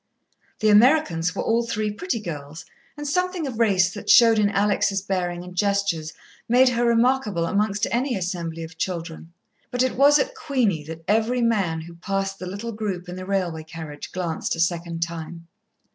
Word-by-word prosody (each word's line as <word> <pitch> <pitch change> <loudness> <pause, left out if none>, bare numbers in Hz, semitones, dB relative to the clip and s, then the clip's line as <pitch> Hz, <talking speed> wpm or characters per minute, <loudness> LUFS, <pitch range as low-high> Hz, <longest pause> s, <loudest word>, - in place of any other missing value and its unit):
The 215 - +4
Americans 210 - +4
were - - -2
all 230 +1 +2
three 215 -2 -2
pretty 235 - -3
girls, 155 -5 -7 0.3
and 295 0 -5
something 360 +2 0
of 250 -5 -5
race 190 -5 +3
that 205 - -7
showed 230 -2 +7
in 205 -1 +3
Alex' 200 0 +1
bearing 180 -2 -2
and 180 0 -11
gestures 200 -5 0 0.4
made 255 +2 +6
her 240 -1 0
remarkable 235 -6 +2
amongst 205 +3 0
any 250 +2 0
assembly 170 -3 -4
of 160 0 -11
children, 165 -2 -4 0.4
but 245 0 +1
it 260 - 0
was 285 +3 +6
at - - -1
Queenie 245 - -1
that 165 +1 -8
every 225 +4 +2
man 195 -9 +1
who 170 +1 -10
passed 195 +2 -3
the 185 - -6
little 200 +5 -5
group 200 -5 -4
in 180 - -6
the 185 0 -7
railway 180 -5 -1
carriage 155 -2 -8
glanced 170 -3 -2
a - - -8
second 170 0 0
time. 165 0 -7
195 Hz, 175 wpm, -23 LUFS, 170-230 Hz, 0.4 s, showed